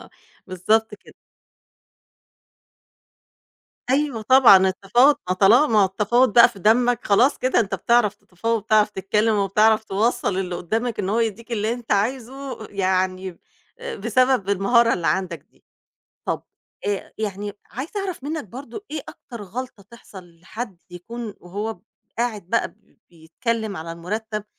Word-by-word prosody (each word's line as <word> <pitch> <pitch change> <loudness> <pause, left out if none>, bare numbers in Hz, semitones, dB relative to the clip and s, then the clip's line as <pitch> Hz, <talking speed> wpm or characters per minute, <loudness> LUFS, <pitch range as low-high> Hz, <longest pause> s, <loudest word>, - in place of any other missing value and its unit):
آه - - -17 0.4
بالضبط 210 +4 0
كده. 210 - -18 2.8
أيوه 275 -4 0
طبعًا 255 -3 +7
التفاوض، 240 +10 +3
ما - - +3
طالما 215 +10 +5
ما 215 -2 +3
هو - - +5
التفاوض 210 +5 +2
بقى 235 - +8
في 195 - -14
دمك 240 +4 +2
خلاص 240 +7 +3
كده 255 - +1
أنت 215 -3 0
بتعرف 235 -4 +2
تتفاوض، 210 +3 -3
وبتعرف 215 0 +2
تتكلم، 210 +2 0
وبتعرف 215 +2 +3
توصّل 215 +1 0
لللي 185 -1 -3
قدّامك 225 +7 -3
إن 185 - -1
هو 220 +3 +1
يدّيك 230 +1 -3
اللي 220 0 0
أنت 240 -1 -8
عايزه 255 +3 -2
يعني 185 -2 -1 0.4
آآ - - -6
بسبب 240 0 +1
المهارة 230 +4 +3
اللي 170 -2 -2
عندك 185 -4 -1
دي. - - -32 0.6
طَب - - -2 0.4
أ 205 -1 -3
يعني 205 -1 -4 0.2
عايزة 300 - -5
أعرف 370 -8 -5
منك 310 0 -4
برضو 245 - -9
إيه 305 0 -4
أكتر 235 -4 -10
غلطة 225 +2 -7
تحصل 185 -7 -14
لحد 200 +2 -7
يكون 215 +5 -8
وهو 205 +5 -4
ب - - -27 0.4
قاعد 235 -4 -1
بقى 230 - -1 0.4
بيتكلم 200 +6 -4
على 165 +1 -6
المرتب، 210 +5 -5
215 Hz, 140 wpm, -22 LUFS, 195-240 Hz, 2.8 s, بقى